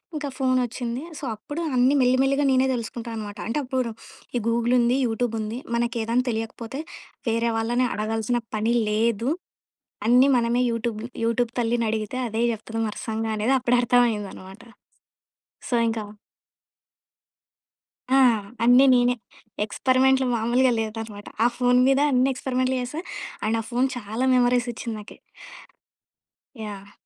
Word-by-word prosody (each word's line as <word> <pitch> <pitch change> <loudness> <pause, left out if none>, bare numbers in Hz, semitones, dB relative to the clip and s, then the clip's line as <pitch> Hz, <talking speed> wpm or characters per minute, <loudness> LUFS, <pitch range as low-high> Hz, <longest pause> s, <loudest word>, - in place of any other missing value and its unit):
ఇంకా 295 -1 -3
ఫోనొచ్చింది. 250 -2 -1 0.2
సో, - - -14
అప్పుడు 290 +9 -6
అన్నీ 250 +2 +4
మెల్లిమెల్లిగా 265 +3 +3
నేనే 260 0 +4
దెలుసుకుంటా 235 0 -5
అనమాట. 210 -1 -6
అంటే 230 - -1
అప్పుడు 255 -2 -2 0.5
ఈ - - +1
గూగులుంది, 235 +1 +2
యూటూబుంది. 225 -1 -2 0.2
మనకేదాని 235 0 0
తెలియకపోతే 225 +3 -4 0.5
వేరే 230 +1 +1
వాళ్ళని 240 +3 +1
అడగాల్సిన 225 +2 -1 0.2
పని 220 +2 +1 0.2
లేదు. 225 +2 +1 0.8
అన్నీ 250 +3 +6
మనమే 240 +1 +1
యూటూబ్ 230 -1 -2 0.3
యూటూబ్ 230 +1 0
తల్లినడిగితే 225 -1 -1
అదే 225 +1 -1
చెప్తుంది 225 0 -4
వర్సంగ 220 +1 -4
అనేది 230 +6 +2
అప్పుడర్థమయిందనమాట. 235 -5 +1 1.1
సో 245 - +1
ఇంకా. 225 -1 -3 2.1
ఆ! - - +6 0.5
అన్నీ 250 +3 +7
నేనే. 245 0 +3 0.5
ఎక్స్‌పెరిమెంట్‌లు 260 +4 +2
మామూలుగా 240 +3 +2
లేదనమాట. 220 -2 -6 0.2
ఆ - - +6
ఫోన్ 250 0 +3
మీద 270 0 +3
అన్ని 255 +1 +3
ఎక్స్‌పెరిమెంట్‌లు 255 0 -1
చేశా. 255 +6 -5 0.5
అండ్ 225 +1 +1
ఆ - - -4
ఫోన్ 250 +2 +2
చాలా 225 +2 -3
మెమోరీస్ 245 0 +3
ఇచ్చింది 230 -1 -5
నాకీ. 210 - -13 1.4
యాహ్! 200 -2 -8
235 Hz, 120 wpm, -24 LUFS, 225-250 Hz, 2.1 s, అన్నీ